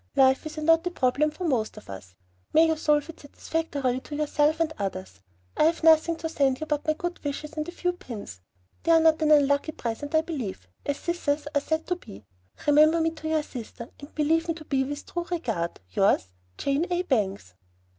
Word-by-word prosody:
Life 265 +2 +4
is 310 - -9
a 310 - -3
knotty 330 +2 +4
problem 295 -2 +1
for 335 +4 -8
most 245 -10 0
of 215 - -12
us. 95 -1 -10 0.4
May 320 - +7
you 320 -1 +2
solve 300 -1 +1
it 330 - -10
satisfactorily 285 -3 -2
to 295 - -8
yourself 300 +1 +1
and 320 -1 0
others! 95 - -4 0.4
I - - +4
have 330 +1 +1
nothing 325 +1 +5
to 325 - -4
send 280 -1 0
but 295 0 -2
my 310 - +4
good 350 +3 -5
wishes 295 +1 -4
and 305 -1 -3
a - - -5
few 360 0 -1
pins. 215 - -9 0.4
They 335 - +1
are 325 - +7
not 320 0 +4
an 310 - +3
unlucky 285 +1 +4
present, 285 +7 -4
I 315 - +5
believe, 240 - -5 0.2
as 285 0 0
scissors 305 -4 -1
are 285 - +2
said 315 +2 -1
to 360 - -1
be. 100 - -13 0.4
Remember 305 +3 +5
me 325 0 +1
to 315 -1 -7
your 315 -1 +1
sister, 235 -3 -8
and 285 +1 -12
believe 325 +2 +2
me 330 - -1
to 310 -2 -11
be 270 -2 +1
with 290 +2 -5
true 345 -1 -4
regard, 225 - -2
Yours, 195 - +2 0.3
JANE 280 +5 0
A. 355 0 +1
BANGS. 200 - -1
300 Hz, 205 wpm, -26 LUFS, 265-325 Hz, 0.4 s, May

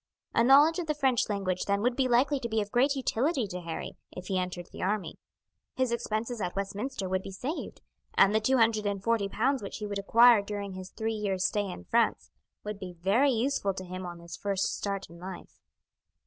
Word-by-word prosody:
A 230 - +4
knowledge 290 +7 +6
of 340 - -3
the 305 - 0
French 265 -6 +2
language 190 -3 -1
then 200 +1 0
would 245 0 +2
be 265 -1 +2
likely 260 +4 +3
to 235 - -4
be 220 0 +1
of 205 -1 -3
great 270 +4 +3
utility 265 +1 0
to 180 -2 -6
Harry 165 -1 -6
if 180 0 -9
he 190 -1 +1
entered 180 -1 -4
the - - -9
army; 190 -4 -2 0.6
his 260 -2 +1
expenses 230 0 -2
at 180 - -3
Westminster 200 +3 -3
would 185 0 0
be 195 - -8
saved, 255 - -5 0.3
and 200 +1 +5
the 220 - +4
two 260 +5 +2
hundred 225 -2 +3
and 200 -1 -2
forty 225 -3 +1
pounds 255 +7 +1
which 200 - -6
he 210 - -5
would 200 -1 -3
acquire 230 +2 +6
during 200 -1 -5
his 185 0 -8
three 225 +3 -3
years' 195 -3 -1
stay 205 +1 0
in 90 - -7
France - - +1 0.3
would 210 -1 -5
be 185 -2 -7
very 200 +11 +2
useful 235 -5 0
to 185 - -6
him 185 +1 -6
on 175 -1 -7
his 170 0 -9
first 195 -1 -1
start 200 -1 -3
in 170 +1 -14
life. 185 0 -9
205 Hz, 220 wpm, -29 LUFS, 190-245 Hz, 0.6 s, knowledge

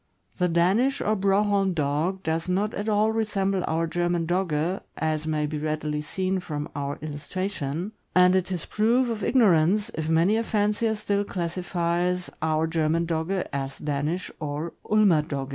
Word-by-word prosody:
The 180 - +3
Danish 195 +11 +2
or 215 - +1
Broholm 195 -1 +2
Dog 155 +6 -1
does 165 +2 -1
not 200 +4 0
at 205 +2 -3
all 215 +1 +3
resemble 195 -4 0
our 165 +1 +1
German 175 0 0
Dogge, 175 0 0 0.2
as 155 0 -1
may 155 -1 0
be 150 0 -3
readily 150 0 -2
seen 185 +4 -1
from 150 -4 -4
our 140 0 -3
illustration, 155 +2 -4 0.2
and 180 0 +6
it 185 0 0
is 175 -4 -3
proof 235 +3 +2
of 220 -2 -4
ignorance 205 -4 +3
if 160 0 -3
many 170 +7 +3
a 230 - 0
fancier 215 +1 +1
still 205 -1 0
classifies 175 -1 -1
our 160 0 +1
German 165 0 +1
Dogge 170 +3 -1
as 135 -1 -3
Danish 150 +5 -2
or 150 +2 -4 0.2
Ulmer 205 -7 +5
Dogge. 140 -3 -4
175 Hz, 160 wpm, -26 LUFS, 155-200 Hz, 0.2 s, and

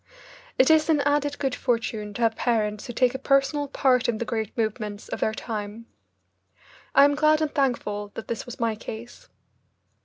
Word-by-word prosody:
It 260 +4 +5
is 315 0 +4
an 305 -3 +4
added 290 0 +1
good 270 -3 -1
fortune 225 -5 -2
to 235 - -1
have 225 -1 +3
parents 215 -4 -1
who 240 - -6
take 250 +1 +2
a 265 - -4
personal 275 +1 +2
part 255 -2 +2
in 230 - 0
the 235 - -3
great 220 -3 -3
movements 215 -2 -3
of - - -4
their 220 - +1
time. 215 0 -5 1.1
I 280 - +8
am 285 - +3
glad 305 +1 +3
and 310 -2 -1
thankful 210 -7 -1
that 225 - -7
this 235 - -4
was 245 - -9
my 230 -2 +1
case. 225 +2 -9
240 Hz, 185 wpm, -25 LUFS, 220-280 Hz, 1.1 s, I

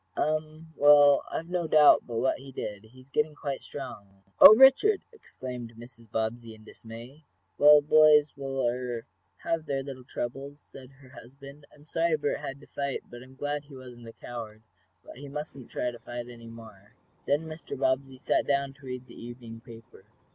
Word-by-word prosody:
"Um. 155 +1 -2
Well, 145 -1 +6
I've 165 - -4
no 175 -2 -1
doubt 150 -1 +5
but 120 - -6
what 130 - 0
he 135 0 -12
did. 105 -4 -7
He's 130 +4 -19
getting 150 +1 0
quite 140 -2 -5
strong." 100 -8 -10 0.2
"Oh, 215 - +11
Richard!" 270 - +5
exclaimed 125 - -9
Mrs. 115 -1 -14
Bobbsey, 115 0 -3
in 110 - -18
dismay. 115 +7 -12 0.4
"Well, 150 0 +8
boys 150 -1 +5
will 135 -2 -2
er 120 -1 -4 0.4
have 165 -1 -2
their 135 -1 -2
little 135 -2 -9
troubles," 135 +4 -6
said 130 -3 -14
her 135 -1 -19
husband. 140 +3 -14
"I'm 150 0 -20
sorry 165 0 0
Bert 145 -1 -2
had 135 +1 -7
to - - -15
fight, 140 -1 -4
but 120 0 -10
I'm 130 +1 -15
glad 145 +1 -4
he 140 -1 -14
wasn't 125 -2 -12
a 115 - -10
coward. 110 -3 -9 0.4
But - - -12
he 140 +2 -9
mustn't 145 -3 -8
fight 120 -1 -3 0.3
any 115 -1 -12
more." 110 -3 -14 0.3
Then 145 +3 +1
Mr. 160 -2 -8
Bobbsey 130 0 -1
sat 130 - 0
down 140 -1 0
to 135 0 -16
read 125 0 -6
the - - -15
evening 120 -1 -10
paper. 115 -2 -15
135 Hz, 175 wpm, -28 LUFS, 120-145 Hz, 0.4 s, Oh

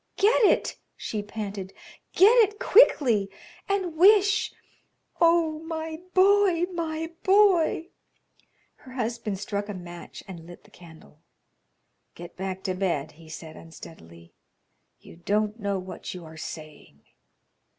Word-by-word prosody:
"Get 440 +4 +3
it," - - +2 0.2
she 215 - -4
panted; 205 -2 -7 0.4
"get 405 +5 +6
it 420 -2 +3
quickly, 245 - +4 0.4
and 380 -5 -1
wish 410 +4 +4 0.7
Oh, 330 -2 +3
my 320 0 -6 0.2
boy, 380 -2 +4
my 325 -1 -4
boy!" 375 -4 +3 0.9
Her 255 - -14
husband 230 -4 -3
struck 205 +1 -4
a 205 - -5
match 175 -1 -10
and 170 -4 -10
lit 175 - -13
the - - -22
candle. 160 -3 -16 1.0
"Get 175 0 -11
back 190 0 -5
to 185 - -1
bed," 175 -6 -2
he 160 +1 -17
said, 160 0 -9
unsteadily. 85 - -14 0.7
"You - - -15
don't 210 +5 -1
know 200 -2 -1
what 185 0 -8
you 175 -2 -9
are 160 0 -12
saying." 155 - -10
210 Hz, 125 wpm, -26 LUFS, -, 1.0 s, get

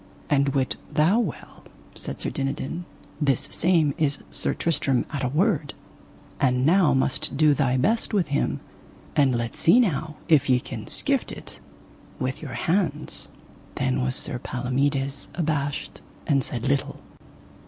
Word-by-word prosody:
And 140 -1 +2
wit 130 -2 0
thou 170 +9 +3
well, 200 -11 -5 0.3
said - - -7
Sir - - -2
Dinadan, 140 +5 -3 0.4
this 140 -4 +2
same 165 -4 +2
is 145 -2 +2
Sir - - +1
Tristram 145 -5 0
at 140 -1 -2
a - - +2
word, 155 - 0 0.6
and 125 -1 +2
now 165 -3 +4
must 130 0 +1
thou - - -8
do 150 0 +5
thy 130 -2 +1
best 220 - +1
with 195 -8 +1
him, 140 - -1 0.5
and 135 -4 +3
let 120 0 -3
see 190 +9 +5
now 155 - 0
if 155 -6 +4
ye 125 -1 +4
can - - -8
skift - - +3
it - - -5 0.6
with 130 +1 -3
your 140 -5 -6
hands. 165 -4 -1 0.5
Then 130 -1 0
was 125 0 0
Sir 120 - -2
Palomides 135 +3 -1
abashed 150 -4 -2 0.2
and 140 -5 +2
said 120 0 -5
little. 140 0 -1
140 Hz, 150 wpm, -25 LUFS, 130-160 Hz, 0.6 s, do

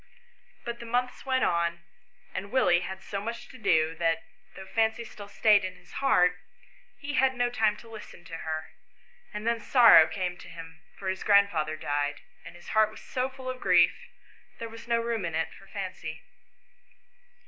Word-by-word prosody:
But 235 0 -5
the 235 - -8
months 250 +3 -2
went 260 -1 +2
on, 170 0 0 0.5
and 200 +1 -5
Willie 210 -9 +4
had 190 +1 -6
so 200 -1 -4
much 230 +3 -6
to 260 - -13
do 160 -6 +2
that, 165 -1 +1 0.3
though 190 - -9
Fancy 220 +3 0
still 205 -2 -11
stayed 205 0 +4
in 185 0 -4
his 180 0 -20
heart, 180 -10 +3 0.6
he 290 0 -6
had 265 -1 +3
no 245 -1 +1
time 220 -3 +2
to 235 - -14
listen 215 -5 -11
to 165 - -7
her; 155 -1 -4 0.6
and 210 0 -6
then 235 0 +1
sorrow 225 -9 +7
came 180 0 -3
to - - -12
him, 165 -1 -11 0.2
for 195 - -7
his 190 0 -2
grandfather 200 -7 +3
died; 145 -1 -2 0.2
and - - -11
his 175 - -13
heart 215 -1 +4
was 215 - -13
so 255 +1 -2
full 260 -1 -11
of 255 0 -4
grief 180 -2 +5 0.6
there 230 - -6
was 230 +1 -11
no 235 -1 +2
room 230 -2 -2
in 165 -2 -3
it 160 0 -1
for 195 - -16
Fancy. 185 -6 -6
200 Hz, 185 wpm, -28 LUFS, 175-235 Hz, 0.6 s, sorrow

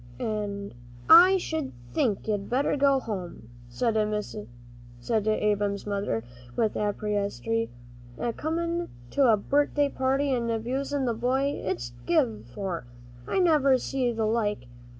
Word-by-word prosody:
"An' 205 - -3 0.4
I 360 +4 +9
sh'd 320 -5 -3 0.2
think 220 -8 0
you'd 205 -2 -1
better 270 +4 +1
go 275 -1 +3
home," 180 - -6 0.2
said 225 - 0
Ab'm's 200 - -2
mother, 200 - -2 0.3
with 220 -2 +1
asperity; 200 - -1 0.5
"a 235 - -2
comin' 335 +4 -2 0.2
to 275 -2 +4
a 215 - +4
birthday 285 +5 +1
party 270 +1 +1
and 235 -2 -1
abusin' 260 +5 -1
the 240 - +1
boy 255 +4 +1
it's 120 -10 -3 0.2
give 110 -9 +1
for. 170 +3 -4 0.4
I - - -1
never 300 -7 +4
see 255 -1 -1
th' 230 - -7
like. 215 - 0
220 Hz, 125 wpm, -27 LUFS, 200-270 Hz, 0.5 s, I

